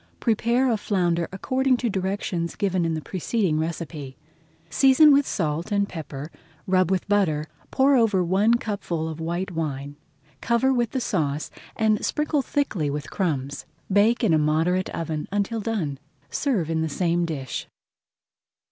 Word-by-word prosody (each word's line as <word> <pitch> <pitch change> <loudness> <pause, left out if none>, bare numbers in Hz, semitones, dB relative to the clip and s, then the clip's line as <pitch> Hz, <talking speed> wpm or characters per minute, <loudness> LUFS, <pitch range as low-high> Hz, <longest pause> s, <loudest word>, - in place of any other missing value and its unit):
Prepare 235 +3 +2
a 225 - +1
flounder 175 -5 0
according 260 +7 +1
to 245 - -1
directions 190 -4 -2
given 185 -4 0
in 165 -1 0
the 155 - -5
preceding 185 - -1
recipe. 160 -4 -5 0.5
Season 270 - +6
with 280 0 +3
salt 165 0 -2
and 200 -1 +2
pepper, 150 -3 -7 0.3
rub 185 -2 +2
with 190 -2 0
butter, 180 -8 +2 0.2
pour 275 +1 +4
over 215 -7 +3
one 200 +6 +3
cupful 195 -8 -3
of 160 0 -6
white 170 +3 -3
wine, 145 -4 -4 0.5
cover 235 +3 +2
with 240 -2 +1
the 260 - -2
sauce, 155 -10 -1 0.2
and 215 -1 +1
sprinkle 300 -1 0
thickly 215 - -1
with 145 0 -4
crumbs. 145 -8 -2 0.3
Bake 220 +5 +4
in 195 -8 +4
a 155 - +4
moderate 160 +5 +1
oven 160 -2 -4
until 205 +3 -1
done. 185 - -2 0.3
Serve 205 - 0
in 160 -1 0
the 160 - -1
same 175 +2 0
dish. 145 -6 -4
185 Hz, 150 wpm, -24 LUFS, 160-225 Hz, 0.5 s, Season